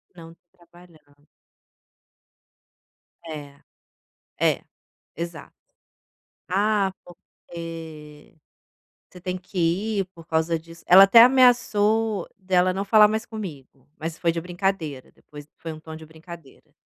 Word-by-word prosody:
Não, 165 Hz, -1 st, -13 dB, 0.2 s
trabalhando. 165 Hz, -5 st, -22 dB, 2.0 s
É 150 Hz, -3 st, -8 dB, 0.9 s
É, -, -, +1 dB, 0.5 s
exato. 170 Hz, +1 st, -7 dB, 0.9 s
"Ah, 200 Hz, 0 st, +1 dB
porque 165 Hz, -4 st, -11 dB, 0.7 s
você 180 Hz, -, -14 dB
tem 180 Hz, 0 st, -4 dB
que 185 Hz, +1 st, -9 dB, 0.4 s
ir 195 Hz, -, 0 dB
por 165 Hz, -2 st, -14 dB
causa 160 Hz, +1 st, 0 dB
disso" 165 Hz, +1 st, -16 dB
ela 190 Hz, +2 st, +9 dB
até 230 Hz, +4 st, +8 dB
ameaçou 225 Hz, -5 st, +3 dB
dela 185 Hz, -1 st, +1 dB
não 195 Hz, +2 st, -3 dB
falar 210 Hz, +1 st, +6 dB
mais 220 Hz, +2 st, -3 dB
comigo, 145 Hz, -, -9 dB
mas 165 Hz, +1 st, -5 dB
foi 170 Hz, -, +1 dB
de 165 Hz, -, -3 dB
brincadeira, 175 Hz, -6 st, -3 dB
depois 145 Hz, 0 st, -14 dB
foi 165 Hz, -, -6 dB
um 155 Hz, -, -10 dB
tom 160 Hz, 0 st, -10 dB
de 160 Hz, 0 st, -12 dB
brincadeira. 160 Hz, -2 st, -14 dB
170 Hz, 115 wpm, -24 LUFS, 160-195 Hz, 2.0 s, ela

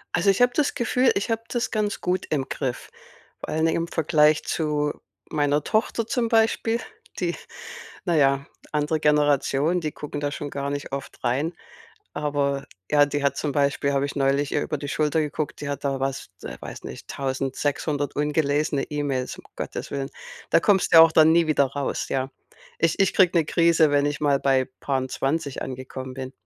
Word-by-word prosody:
Also, 200 Hz, -, +2 dB
ich 195 Hz, +5 st, +3 dB
habe 245 Hz, 0 st, +5 dB
das 300 Hz, -2 st, +1 dB
Gefühl, 250 Hz, +1 st, +2 dB
ich 200 Hz, +4 st, -1 dB
habe 225 Hz, 0 st, -1 dB
das 240 Hz, -1 st, -2 dB
ganz 210 Hz, -2 st, -1 dB
gut 180 Hz, +1 st, -1 dB
im 140 Hz, -3 st, -1 dB
Griff, 125 Hz, -2 st, -4 dB, 0.5 s
weil, 160 Hz, +1 st, -2 dB
ne, 160 Hz, -, +3 dB
im 170 Hz, -, 0 dB
Vergleich 155 Hz, -1 st, +3 dB
zu 150 Hz, -2 st, 0 dB, 0.4 s
meiner 145 Hz, -1 st, +1 dB
Tochter 220 Hz, +5 st, 0 dB
zum 240 Hz, -3 st, 0 dB
Beispiel, 225 Hz, 0 st, +2 dB, 0.4 s
die -, -, -1 dB, 0.7 s
na 175 Hz, -3 st, +1 dB
ja, 140 Hz, -1 st, +3 dB, 0.3 s
andere 150 Hz, +1 st, 0 dB
Generation, 150 Hz, +2 st, +2 dB
die 155 Hz, -, -2 dB
gucken 145 Hz, 0 st, -6 dB
da 145 Hz, 0 st, -1 dB
schon 145 Hz, 0 st, -5 dB
gar 140 Hz, 0 st, -3 dB
nicht 145 Hz, -1 st, -5 dB
oft 140 Hz, 0 st, -6 dB
rein. 145 Hz, +7 st, +1 dB, 0.6 s
Aber, 145 Hz, -2 st, -1 dB, 0.2 s
ja, 145 Hz, -1 st, +5 dB
die 145 Hz, 0 st, -2 dB
hat 140 Hz, -1 st, +1 dB
zum 145 Hz, 0 st, -2 dB
Beispiel 140 Hz, 0 st, +1 dB
habe 140 Hz, 0 st, +1 dB
ich 140 Hz, -, -4 dB
neulich 140 Hz, +1 st, +1 dB
ihr 145 Hz, -, +1 dB
über 150 Hz, -, -3 dB
die 145 Hz, -, -6 dB
Schulter 150 Hz, +2 st, +1 dB
geguckt, 150 Hz, 0 st, -3 dB
die 145 Hz, -, -4 dB
hat 140 Hz, 0 st, -4 dB
da 135 Hz, -1 st, -1 dB
was 135 Hz, 0 st, -3 dB
d -, -, -6 dB
äh, -, -, -7 dB
weiß -, -, -8 dB
nicht, -, -, -9 dB
1.600 140 Hz, +2 st, -2 dB
ungelesene 150 Hz, -1 st, +1 dB
E-Mails, 140 Hz, -4 st, -2 dB
um -, -, -13 dB
Gottes -, -, -5 dB
Willen. 140 Hz, 0 st, -3 dB, 0.4 s
Da -, -, +6 dB
kommst 190 Hz, +2 st, +2 dB
du -, -, +8 dB
ja 160 Hz, -, +12 dB
auch 165 Hz, -, +2 dB
dann 160 Hz, 0 st, +6 dB
nie 165 Hz, 0 st, +4 dB
wieder 145 Hz, -3 st, +3 dB
raus, 140 Hz, +1 st, -3 dB
ja. 135 Hz, 0 st, -1 dB, 0.5 s
Ich 165 Hz, -1 st, +2 dB
ich 195 Hz, -1 st, +2 dB
kriege 180 Hz, -2 st, +4 dB
'ne 160 Hz, -, +2 dB
Krise, 165 Hz, -1 st, +3 dB
wenn 145 Hz, 0 st, +3 dB
ich 145 Hz, 0 st, -2 dB
mal 140 Hz, -2 st, +2 dB
bei 135 Hz, -1 st, +3 dB, 0.2 s
paar 135 Hz, -1 st, 0 dB
'n 130 Hz, -, -4 dB
20 140 Hz, +2 st, -2 dB
angekommen 130 Hz, 0 st, -7 dB
bin. 130 Hz, 0 st, -6 dB
145 Hz, 195 wpm, -24 LUFS, 140-160 Hz, 0.7 s, ja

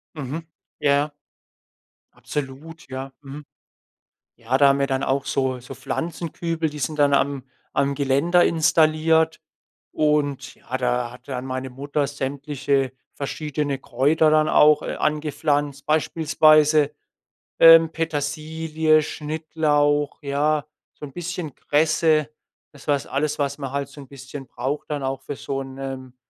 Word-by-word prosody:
Mhm. 150 Hz, +3 st, -5 dB, 0.3 s
Ja. 145 Hz, +1 st, +2 dB, 1.0 s
Absolut, 150 Hz, +3 st, -7 dB
ja. 135 Hz, +1 st, -6 dB
Mhm. 145 Hz, +2 st, -9 dB, 0.9 s
Ja, 120 Hz, +2 st, -1 dB
da 140 Hz, 0 st, +6 dB
haben 140 Hz, 0 st, +3 dB
wir 140 Hz, -, +2 dB
dann 135 Hz, 0 st, -1 dB
auch 135 Hz, +1 st, 0 dB
so 130 Hz, -1 st, -1 dB
so 125 Hz, -, -10 dB
Pflanzenkübel, 165 Hz, 0 st, -3 dB
die 150 Hz, -, -8 dB
sind 150 Hz, +3 st, -3 dB
dann 145 Hz, -1 st, +4 dB
am 140 Hz, -1 st, 0 dB, 0.3 s
am 140 Hz, 0 st, +1 dB
Geländer 140 Hz, +6 st, +3 dB
installiert 160 Hz, 0 st, +3 dB, 0.5 s
und 145 Hz, -2 st, 0 dB
ja, 130 Hz, -, -5 dB
da 125 Hz, -1 st, -1 dB
hat 125 Hz, -, -15 dB
dann 130 Hz, -1 st, -4 dB
meine 130 Hz, 0 st, -4 dB
Mutter 140 Hz, +2 st, -2 dB
sämtliche 140 Hz, -1 st, -2 dB, 0.2 s
verschiedene 145 Hz, 0 st, -3 dB
Kräuter 145 Hz, +5 st, +2 dB
dann 155 Hz, 0 st, +3 dB
auch, 150 Hz, 0 st, +5 dB
äh, -, -, -4 dB
angepflanzt, 145 Hz, -2 st, -1 dB
beispielsweise, 155 Hz, -1 st, +4 dB, 0.7 s
ähm, 165 Hz, 0 st, +9 dB
Petersilie, 155 Hz, 0 st, 0 dB
Schnittlauch, 150 Hz, -1 st, 0 dB
ja, 145 Hz, +1 st, 0 dB, 0.3 s
so -, -, -10 dB
'n 135 Hz, -, -12 dB
bisschen 175 Hz, -3 st, -5 dB
Kresse. 155 Hz, 0 st, +2 dB, 0.4 s
Das 145 Hz, 0 st, -16 dB
was 140 Hz, -1 st, +1 dB
alles 145 Hz, +2 st, -1 dB
was 140 Hz, 0 st, -1 dB
man 135 Hz, -3 st, -5 dB
halt 140 Hz, -1 st, -2 dB
so 145 Hz, -, -12 dB
'n 135 Hz, -, -12 dB
bisschen 135 Hz, 0 st, -9 dB
braucht 135 Hz, +6 st, -4 dB
dann 145 Hz, -2 st, -2 dB
auch 135 Hz, 0 st, -3 dB
für 145 Hz, -, -6 dB
so 135 Hz, 0 st, -4 dB
'nen 135 Hz, -1 st, -7 dB
145 Hz, 135 wpm, -23 LUFS, 135-155 Hz, 1.0 s, ähm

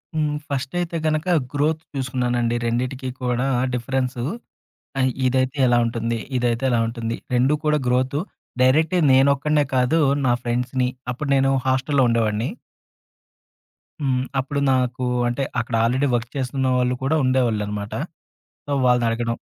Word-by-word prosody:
హ్మ్. 150 Hz, -1 st, 0 dB
ఫస్టయితే 160 Hz, +5 st, -2 dB
గనక 155 Hz, +2 st, 0 dB, 0.3 s
గ్రోత్ 150 Hz, +2 st, +1 dB
చూసుకున్నానండి. 125 Hz, -3 st, 0 dB
రెండిటికి 125 Hz, +3 st, -2 dB
కూడా 125 Hz, +1 st, 0 dB, 0.3 s
డిఫరెన్సు, 125 Hz, 0 st, -2 dB, 0.8 s
ఆహ్, 130 Hz, 0 st, +3 dB, 0.2 s
ఇదైతే 130 Hz, +2 st, 0 dB
ఎలా 120 Hz, 0 st, +4 dB
ఉంటుంది? 115 Hz, 0 st, -2 dB, 0.2 s
ఇదైతే 120 Hz, 0 st, 0 dB
ఎలా 120 Hz, -2 st, +2 dB
ఉంటుంది? 115 Hz, 0 st, -3 dB, 0.2 s
2 130 Hz, +4 st, +3 dB
కూడా 150 Hz, 0 st, +3 dB
గ్రోతు, 130 Hz, +3 st, +1 dB, 0.4 s
డైరెక్ట్‌గా 160 Hz, +7 st, +3 dB
నేనొక్కడినే 140 Hz, +3 st, +3 dB
కాదు. 130 Hz, +6 st, +3 dB, 0.3 s
నా 120 Hz, -, +4 dB
ఫ్రెండ్స్‌ని 125 Hz, +1 st, 0 dB, 0.2 s
అప్పుడు 140 Hz, +3 st, -4 dB
నేను 135 Hz, 0 st, +3 dB, 0.2 s
హాస్టల్‌లో 135 Hz, +1 st, +2 dB
ఉండేవాడిని. 115 Hz, +1 st, 0 dB, 1.5 s
హ్మ్. 130 Hz, -3 st, 0 dB, 0.2 s
అప్పుడు 140 Hz, +2 st, -2 dB
నాకు 130 Hz, 0 st, 0 dB, 0.2 s
అంటే, 120 Hz, +3 st, -1 dB, 0.2 s
అక్కడ 120 Hz, -, -2 dB
ఆల్రెడీ 130 Hz, +5 st, +2 dB
వర్క్ 120 Hz, 0 st, -3 dB
చేస్తున్న 130 Hz, 0 st, -1 dB
వాళ్ళు 125 Hz, 0 st, +1 dB
కూడా 140 Hz, +4 st, +2 dB
ఉండేవాళ్ళున్నమాట. 110 Hz, -5 st, 0 dB, 0.7 s
సో, 145 Hz, -, -6 dB
వాళ్ళని 125 Hz, -1 st, +3 dB
అడగడం 115 Hz, 0 st, -1 dB
130 Hz, 125 wpm, -22 LUFS, 120-140 Hz, 1.5 s, ఎలా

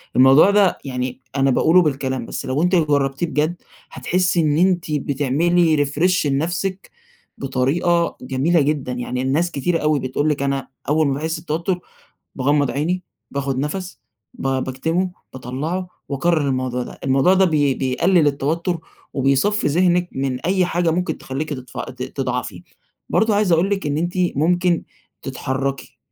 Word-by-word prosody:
الموضوع 135 Hz, +8 st, +7 dB
ده 200 Hz, -2 st, +3 dB
يعني 125 Hz, -1 st, -4 dB
أنا 135 Hz, -1 st, +3 dB
باقوله 160 Hz, +7 st, +5 dB
بالكلام، 135 Hz, -5 st, -1 dB
بس -, -, -5 dB
لو 135 Hz, +5 st, 0 dB
أنتِ 180 Hz, +1 st, +3 dB
جربتيه 145 Hz, -2 st, +1 dB
بجد 155 Hz, +2 st, 0 dB, 0.4 s
هتحسي 180 Hz, -1 st, +1 dB
إن 150 Hz, -2 st, +2 dB
أنتِ 175 Hz, -2 st, +2 dB
بتعملي 150 Hz, +3 st, +2 dB
refresh 165 Hz, +5 st, +1 dB
لنَفسِك 175 Hz, +7 st, -2 dB, 0.5 s
بطريقة 165 Hz, +6 st, 0 dB
جميلة 135 Hz, +6 st, +1 dB
جدًا، 140 Hz, -3 st, -1 dB
يعني 125 Hz, +1 st, -3 dB
الناس 150 Hz, +7 st, 0 dB
كتيرة 165 Hz, +3 st, 0 dB
أوي 150 Hz, -1 st, +1 dB
بتقول 135 Hz, +4 st, -1 dB
لِك 145 Hz, -2 st, -1 dB
أنا 140 Hz, -1 st, -1 dB, 0.2 s
أول 155 Hz, 0 st, +3 dB
ما 140 Hz, -, +1 dB
باحس 160 Hz, +4 st, -3 dB
بتوتر 170 Hz, +3 st, -2 dB, 0.6 s
باغمض 140 Hz, +1 st, +1 dB
عيني، 170 Hz, +6 st, -1 dB, 0.3 s
باخد 135 Hz, -2 st, -2 dB
نَفَس، 180 Hz, +7 st, -4 dB, 0.3 s
ب -, -, -5 dB, 0.2 s
باكتمه، 160 Hz, +8 st, -1 dB, 0.2 s
باطلعه، 145 Hz, +9 st, -4 dB, 0.2 s
وأكرر 150 Hz, +1 st, +1 dB
الموضوع 130 Hz, -1 st, -1 dB
ده، -, -, -9 dB
الموضوع 135 Hz, +7 st, +4 dB
ده 190 Hz, 0 st, +4 dB
بي 145 Hz, -6 st, +2 dB
بيقلل 155 Hz, +7 st, +2 dB
التوتر 165 Hz, +5 st, -1 dB, 0.4 s
وبيصفي 140 Hz, +10 st, +2 dB
ذهنِك 175 Hz, +3 st, +2 dB
من 130 Hz, -1 st, -2 dB
أي 185 Hz, +2 st, +1 dB
حاجة 175 Hz, -1 st, +1 dB
ممكن 170 Hz, -1 st, -1 dB
تخليكِ 140 Hz, +4 st, -4 dB
تضفعي 130 Hz, -3 st, -6 dB
ت -, -, -6 dB
تضعفي، -, -, -4 dB, 0.5 s
برضو 220 Hz, 0 st, +2 dB
عايز 205 Hz, -3 st, +2 dB
أقول 170 Hz, +4 st, +3 dB
لِك 195 Hz, -5 st, -1 dB
إن 145 Hz, 0 st, -1 dB
أنتِ 175 Hz, +2 st, -1 dB, 0.2 s
ممكن 175 Hz, +3 st, +2 dB, 0.4 s
تتحركي، 135 Hz, 0 st, -3 dB
150 Hz, 145 wpm, -20 LUFS, 135-175 Hz, 0.6 s, الموضوع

